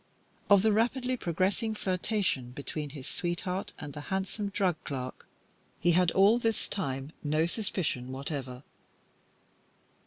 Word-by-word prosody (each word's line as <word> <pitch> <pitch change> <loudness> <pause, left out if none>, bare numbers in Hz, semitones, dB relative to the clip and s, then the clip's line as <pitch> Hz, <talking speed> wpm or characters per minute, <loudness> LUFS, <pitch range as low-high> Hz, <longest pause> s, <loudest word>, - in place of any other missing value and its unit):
Of 200 -1 +7
the 220 -1 +4
rapidly 250 +3 +2
progressing 195 +3 0
flirtation 185 - 0
between 145 +2 -4
his 135 -2 -8
sweetheart 180 +2 -2
and 145 -1 -7
the 150 - -6
handsome 195 +2 -1
drug 190 -4 +1
clerk 130 -2 -5 0.5
he 175 - +4
had 180 0 +5
all 205 +5 +6
this 225 -2 +1
time 135 -6 -2
no 155 +2 +2
suspicion 170 - -1
whatever. 135 -1 -4
180 Hz, 125 wpm, -30 LUFS, 145-205 Hz, 0.5 s, Of